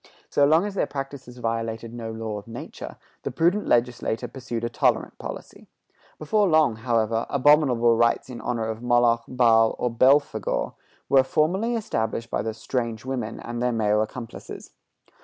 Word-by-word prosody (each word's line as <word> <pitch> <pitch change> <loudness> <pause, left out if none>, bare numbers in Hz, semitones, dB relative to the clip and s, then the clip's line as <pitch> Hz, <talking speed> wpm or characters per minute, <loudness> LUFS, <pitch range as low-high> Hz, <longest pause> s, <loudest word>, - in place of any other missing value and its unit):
So 140 - +4
long 160 +5 +4
as 205 - -4
their 195 - 0
practices 135 -3 -7
violated 115 -1 -3
no 115 -1 -6
law 110 -2 -4
of 100 - -16
nature, 115 +1 -8 0.2
the - - -3
prudent 170 +10 +1
legislator 120 -2 0
pursued 120 -3 -6
a - - +1
tolerant 115 - 0
policy. - - -9 0.5
Before 205 +7 +1
long, 155 -9 +3
however, 115 -1 0
abominable 130 -5 +4
rites 115 +1 +2
in 125 -2 -8
honor 115 -2 -2
of 110 0 -4
Moloch, 120 -1 +3
Baal, 115 -3 +4
or 125 - -1
Belphegor, 130 -3 +2 0.3
were 135 -1 +6
formally 185 - +1
established 115 - -2
by - - 0
the 110 0 -4
"strange 115 -1 -3
women" 125 -4 -4
and 120 0 -5
their 125 0 +1
male 105 -2 +2
accomplices. 115 +2 -7
120 Hz, 160 wpm, -24 LUFS, 115-135 Hz, 0.5 s, were